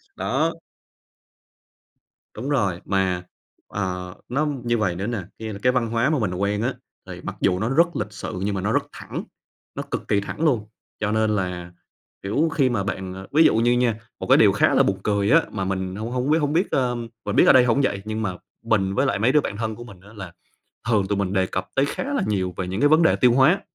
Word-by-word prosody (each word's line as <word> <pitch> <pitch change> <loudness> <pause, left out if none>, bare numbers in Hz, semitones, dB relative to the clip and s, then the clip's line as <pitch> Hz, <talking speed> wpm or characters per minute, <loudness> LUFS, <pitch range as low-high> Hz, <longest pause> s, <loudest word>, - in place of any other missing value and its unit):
đó. 155 +6 0 1.8
Đúng 125 +6 -5
rồi, 100 -11 0
mà, 95 -2 0 0.4
ờ, 90 -2 -4 0.2
nó 145 +5 0 0.2
như 120 0 +1
vầy 95 -5 0
nữa 95 +4 -3
nè, 120 -1 -2 0.2
kia 110 -1 -5
là 100 - -8
cái 125 - +4
văn 125 -2 0
hóa 115 +4 +1
mà 155 - +1
mình 100 -6 -1
quen 100 +3 -1
á, 125 +3 0 0.3
thì - - -8
mặc - - -5
dù 90 -1 +2
nó 110 - -1
rất 165 +6 +4
lịch 105 - -3
sự 95 -2 -6
nhưng 100 0 -1
mà 95 - -2
nó 105 +4 0
rất - - +2
thẳng, - - -6 0.5
nó - - -3
cực - - -3
kỳ 100 - +2
thẳng 125 - -6
luôn. 115 -8 +1 0.3
Cho 105 -1 -1
nên 110 0 +2
là, 90 -3 -3 0.5
kiểu, 140 +12 +1
khi 135 -5 +3
mà 110 -6 -1
bạn, 95 -3 -4
ờ 95 +1 -9
ví 155 +3 +5
dụ - - +4
như 115 +2 +3
nha, 120 -2 +2 0.2
một - - -5
cái - - +6
điều - - +6
khá - - +2
là - - +5
buồn 95 -1 0
cười 100 0 +1
á, 165 +2 +7
mà 95 - -3
mình 95 0 -3
hông 110 +3 -5
hông 125 +2 -1
biết 155 - +5
hổng 150 -2 0
biết, 175 +5 +1
ờm 120 -3 0 0.2
mình 105 - -2
biết - - +6
ở - - +8
đây 125 -1 +6
hổng 125 +3 +2
vậy, 100 -7 0
nhưng 110 +1 -3
mà 95 -4 -3 0.3
mình, 100 -4 +1
với 135 - +2
lại 135 - 0
mấy 115 +5 +3
đứa 150 +1 +4
bạn 100 - -5
thân 110 -1 -3
của 120 - -9
mình 100 -6 -13
á 100 - -16
là 95 -4 -8 0.6
thường 100 -4 +2
tụi 100 - -1
mình 100 -1 -1
đề 95 -1 +2
cập 95 +1 -4
tới 135 - +3
khá - - -4
là 275 - +1
nhiều 95 -3 -1
về 95 - -3
những 95 +5 -3
cái 145 - +6
vấn 155 +2 +5
đề - - +4
tiêu 125 -2 +4
hóa. 155 +10 +4
110 Hz, 250 wpm, -23 LUFS, 95-125 Hz, 1.8 s, ở